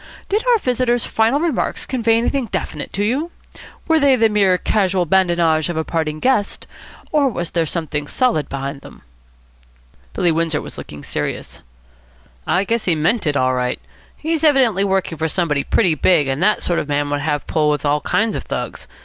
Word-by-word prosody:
Did 420 +3 +1
our 485 -2 +5
visitor's 250 - 0
final 225 +6 +1
remarks 325 -5 -1
convey 230 -3 +1
anything 245 +2 0
definite - - -4
to 205 - -1
you? 270 +10 0 0.6
Were 320 -1 +4
they 280 -2 +5
the 225 -2 +3
mere 200 -3 +3
casual 190 -2 +1
badinage 170 -3 +2
of 170 - -3
a 160 - 0
parting 155 -2 -2
guest, 250 -4 0 0.5
or 290 -3 +3
was 175 -7 -4
there 165 -2 0
something 150 -3 -3
solid 235 - 0
behind 140 +1 -5
them?" - - -14 1.1
Billy 175 - +2
Windsor 165 -1 0
was - - -8
looking 75 -1 -9
serious. - - -5 0.9
"I 180 +3 +2
guess 230 +2 -1
he 175 - +2
meant 175 +5 +1
it 145 -1 +1
all 130 -1 +2
right. 125 0 -1 0.4
He's 320 +1 -2
evidently 260 - +4
working 190 -4 -1
for 160 0 0
somebody 150 -5 0
pretty 180 -8 +2
big, 155 -1 +3
and 135 +2 -2
that 210 +3 +2
sort 175 - +1
of - - -4
man 145 0 0
would 145 0 -1
have 145 -1 -1
a - - -36
pull 155 -1 +1
with 150 -1 -1
all 145 +1 +1
kinds 220 0 0
of - - -3
Thugs. - - -5
180 Hz, 190 wpm, -19 LUFS, 155-235 Hz, 1.1 s, our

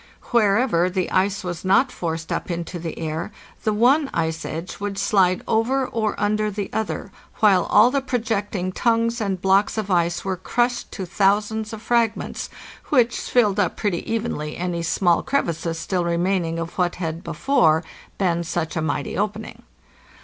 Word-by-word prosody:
© - - -24 0.3
Wher 210 -4 +4
ever 185 -8 +2
the 185 -1 -2
ice 195 +1 +1
was 175 -2 -5
not 200 +8 +3
forced 165 -4 -4
up - - -2
into 170 +1 -4
the 165 -1 -5
air, 160 +4 -3 0.3
the 215 - +2
one 265 +7 +3
ice 160 -1 -1
edge 165 +3 -6
would 200 -1 -4
slide 185 -4 +2
over 255 +4 +1
or 220 -5 -2
under 210 +1 +1
the 205 -1 -4
other, 220 -2 -3 0.2
while 200 -4 +4
all 245 - +5
the 280 0 +1
projecting 215 -7 -2
tongues 230 +2 +1
and 195 -3 -1
blocks 195 +3 +3
of 210 -2 -2
ice 170 0 +1
were 190 -1 0
crushed 240 +6 -1
to 190 - -4
thousands 210 +4 +1
of 220 0 -8
frag 235 -3 +2
ments, - - -5 0.4
which 245 -4 +3
filled 210 -5 +2
up 185 -4 +1
pretty 200 -3 -2
evenly 180 -10 -2
any 175 -1 -2
small 170 +1 +2
crevices 170 - -1
still 180 +2 -1
re 170 0 0
maining 175 -2 0
of 165 +3 -6
what 175 -1 +1
had 165 -1 -4
before 165 - +2 0.3
been 170 -3 +1
such 165 -1 -3
a 160 - 0
mighty 145 -2 -2
opening. 210 +2 -3
195 Hz, 175 wpm, -22 LUFS, 170-220 Hz, 0.4 s, all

